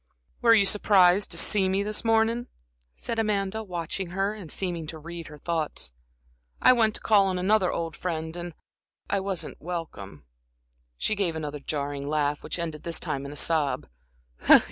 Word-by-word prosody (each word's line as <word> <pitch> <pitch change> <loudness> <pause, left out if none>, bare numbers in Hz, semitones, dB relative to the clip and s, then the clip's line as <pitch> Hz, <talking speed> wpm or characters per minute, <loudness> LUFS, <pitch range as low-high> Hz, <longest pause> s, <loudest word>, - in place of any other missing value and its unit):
"Were 230 -1 +7
you 205 -3 +5
surprised 195 -1 +4
to - - -4
see 195 -3 +2
me 195 +1 +1
this 210 +1 -2
morning?" 225 +1 +2 0.5
said 225 - -3
Amanda, 210 -1 0
watching 180 0 -4
her 195 +4 -1
and 195 -7 -8
seeming 175 -4 -2
to 160 - -6
read 170 +1 -8
her 150 - -11
thoughts. 160 - -2 0.7
"I - - +7
went 220 -3 +3
to - - -3
call 205 -3 +4
on 185 -1 -1
another 190 +1 +3
old 165 -1 -3
friend, 160 -2 -3
and 175 -2 -6 0.6
I 200 - +2
wasn't 190 -2 -3
welcome" 150 - -6 0.7
she - - 0
gave 195 -6 0
another 150 -2 -4
jarring 140 -1 -3
laugh, 150 -1 0
which - - -3
ended 160 -3 -3
this 170 -1 -1
time 140 -4 -3
in - - -7
a 145 - -8
sob. 155 -4 +1
175 Hz, 170 wpm, -27 LUFS, 155-200 Hz, 0.7 s, Were